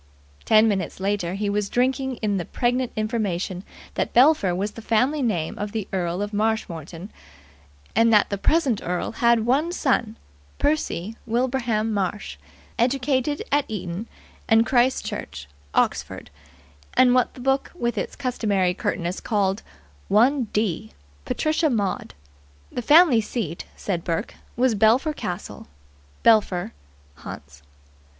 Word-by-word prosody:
Ten 215 Hz, +1 st, +5 dB
minutes 195 Hz, -4 st, -2 dB
later 190 Hz, -2 st, -1 dB
he 205 Hz, +1 st, -2 dB
was 200 Hz, 0 st, -1 dB
drinking 260 Hz, +1 st, 0 dB
in 205 Hz, -2 st, +1 dB
the 180 Hz, -, -2 dB
pregnant 245 Hz, +4 st, 0 dB
information 205 Hz, -4 st, -2 dB, 0.3 s
that -, -, -2 dB
Belpher 245 Hz, -, +5 dB
was 200 Hz, +3 st, -2 dB
the 225 Hz, -, -10 dB
family 255 Hz, +7 st, +1 dB
name 180 Hz, -10 st, -1 dB
of 205 Hz, +1 st, -4 dB
the 220 Hz, -3 st, -3 dB
Earl 180 Hz, +1 st, -1 dB
of 205 Hz, +1 st, -6 dB
Marshmoreton, 195 Hz, -5 st, -2 dB, 0.8 s
and 230 Hz, 0 st, +4 dB
that 210 Hz, -1 st, +4 dB
the 200 Hz, -, -1 dB
present 275 Hz, -4 st, +2 dB
earl 180 Hz, 0 st, -2 dB
had 235 Hz, -1 st, +2 dB
one 285 Hz, +8 st, +2 dB
son, 250 Hz, -9 st, 0 dB, 0.4 s
Percy 230 Hz, -, -1 dB
Wilbraham 235 Hz, -2 st, 0 dB
Marsh, 200 Hz, 0 st, -3 dB, 0.4 s
educ. 260 Hz, +3 st, +1 dB, 0.3 s
Eton 190 Hz, 0 st, -5 dB, 0.4 s
and 225 Hz, +1 st, +5 dB
Christ 250 Hz, +2 st, +2 dB
Church, 70 Hz, -, -6 dB, 0.3 s
Oxford, -, -, -1 dB, 0.6 s
and 250 Hz, -1 st, +5 dB
what 250 Hz, -1 st, +2 dB
the -, -, -11 dB
book 270 Hz, +2 st, 0 dB
with 240 Hz, -8 st, -1 dB
its -, -, -3 dB
customary 210 Hz, -9 st, 0 dB
curtness 175 Hz, 0 st, -2 dB
called 200 Hz, -1 st, 0 dB, 0.5 s
"one 245 Hz, +5 st, +3 dB
d." 205 Hz, -, -2 dB, 0.3 s
Patricia 310 Hz, +1 st, +1 dB
Maud. 205 Hz, -, -2 dB, 0.6 s
The -, -, -3 dB
family 295 Hz, -2 st, +6 dB
seat, 210 Hz, -6 st, -4 dB
said 175 Hz, -4 st, -3 dB
Burke, 165 Hz, -1 st, -2 dB, 0.2 s
was 250 Hz, 0 st, +2 dB
Belpher 225 Hz, +9 st, +3 dB
Castle, 175 Hz, -, -6 dB, 0.6 s
Belpher, 205 Hz, -6 st, +3 dB, 0.4 s
Hants. 70 Hz, 0 st, -10 dB
220 Hz, 130 wpm, -24 LUFS, 195-250 Hz, 0.8 s, family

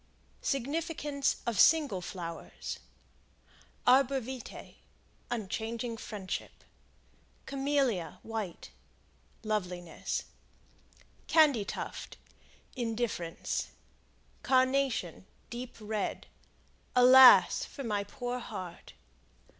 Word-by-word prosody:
Significance 290 Hz, +1 st, -1 dB
of 235 Hz, -3 st, -1 dB
Single 290 Hz, -, +5 dB
Flowers. 170 Hz, -2 st, -6 dB, 1.1 s
Arbor 270 Hz, +1 st, +5 dB
Vitae 255 Hz, 0 st, -8 dB, 0.6 s
Unchanging 230 Hz, +1 st, -3 dB
friendship. 210 Hz, -4 st, -6 dB, 0.8 s
Camelia, 270 Hz, -, 0 dB
White 220 Hz, -6 st, -5 dB, 0.7 s
Loveliness. 180 Hz, -6 st, -3 dB, 1.0 s
Candy 295 Hz, -9 st, +5 dB
Tuft -, -, -6 dB, 0.6 s
Indifference. 225 Hz, -, -2 dB, 0.7 s
Carnation, 260 Hz, -, +1 dB, 0.2 s
Deep 245 Hz, +1 st, -6 dB
Red 215 Hz, -1 st, -3 dB, 0.7 s
Alas! 250 Hz, -6 st, +8 dB
for 275 Hz, -, -8 dB
my 210 Hz, -4 st, -1 dB
poor 245 Hz, +3 st, -4 dB
heart. 180 Hz, -7 st, -8 dB
235 Hz, 65 wpm, -31 LUFS, 200-270 Hz, 1.1 s, Alas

